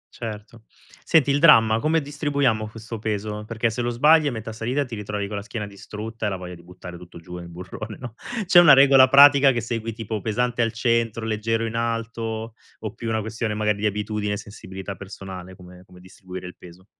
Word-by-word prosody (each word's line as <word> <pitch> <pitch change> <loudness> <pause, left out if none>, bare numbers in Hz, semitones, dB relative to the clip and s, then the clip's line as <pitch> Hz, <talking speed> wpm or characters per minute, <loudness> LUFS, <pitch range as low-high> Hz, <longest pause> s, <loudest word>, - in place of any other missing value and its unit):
Certo. 110 0 -8 0.4
Senti, 145 -4 +3
il 140 - +2
dramma: 115 -8 +6
come 160 +5 +2
distribuiamo 140 -7 -1
questo 115 0 -8
peso? 105 0 -4
Perché 115 0 -1
se 120 - -3
lo 120 - -1
sbagli 150 +5 +4
a - - 0
metà 110 -1 -6
salita 125 +6 -2
ti 120 - -11
ritrovi 105 -1 -4
con 100 0 -5
la - - -4
schiena 105 +1 -6
distrutta 105 +2 -6
e - - +1
la 95 - -3
voglia 90 0 -8
di 85 - -12
buttare 90 0 -11
tutto 90 -1 -13
giù 90 +1 -9
in 85 0 -10
burrone, 95 +5 -8
no. 120 -3 -8 0.3
C'è 175 0 +7
una 155 -5 +8
regola 135 -1 +7
pratica 140 0 +7
che 120 - -1
segui, 115 0 -4
tipo: 110 -2 -5
pesante 120 +2 -1
al 115 -1 +1
centro, 115 -1 0
leggero 115 +1 -1
in 115 - -4
alto, 115 -1 -3 0.3
o 110 -2 -5
più 115 -1 -6
una 110 -1 0
questione 110 0 -3
magari 105 -1 0
di 105 - +1
abitudine 105 0 -2
e - - -2
sensibilità 95 -1 -8
personale 95 -1 -9
come 90 0 -14
come 90 -1 -17
distribuire 95 0 -10
il 90 - -9
peso? 90 +1 -15
110 Hz, 210 wpm, -23 LUFS, 100-120 Hz, 0.4 s, una